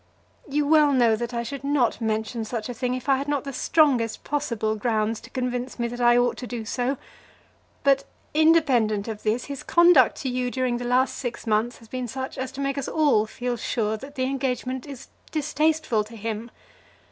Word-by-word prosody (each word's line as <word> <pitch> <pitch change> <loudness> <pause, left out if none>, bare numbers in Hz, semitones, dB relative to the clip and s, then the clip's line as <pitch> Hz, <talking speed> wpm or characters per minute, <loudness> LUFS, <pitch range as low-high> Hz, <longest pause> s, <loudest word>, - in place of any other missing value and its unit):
You 290 +1 +1
well 300 -1 +5
know 235 -4 +4
that 235 +2 -4
I 235 -1 -2
should 275 +3 -6
not 275 -5 +1
mention 220 +1 -1
such 220 +1 -4
a - - -3
thing, 250 +1 -2
if 255 - -7
I 270 -1 +4
had 275 +2 -4
not 290 -2 0
the 275 -1 -6
strongest 250 -8 +2
possible 235 -7 -1
grounds 220 0 0
to - - -13
convince 250 0 -3
me 235 -1 -1
that 245 +1 -6
I 240 0 +5
ought 245 0 +2
to 250 - -6
do 235 -2 -5
so. 255 +4 -1 0.9
But, 275 -1 +3 0.3
independent 275 -10 +3
of 215 -2 -5
this, 220 +3 0
his 280 -2 -6
conduct 340 -7 +5
to 265 - -2
you 250 0 -1
during 255 -1 -1
the 245 - -5
last 250 +2 +2
six 245 -2 -5
months 225 +2 +1
has 230 - -17
been 255 +1 -4
such 260 +3 -5
as 260 0 -3
to 275 - -5
make 275 0 -1
us 270 - -4
all 285 -9 +3
feel 245 +2 -3
sure 220 -1 -1
that 275 +6 -10
the 255 - -1
engagement 260 0 -2
is 275 -4 -9 0.2
distasteful 305 -6 +1
to 225 +2 -12
him. 225 +1 -4
250 Hz, 205 wpm, -25 LUFS, 230-275 Hz, 0.9 s, well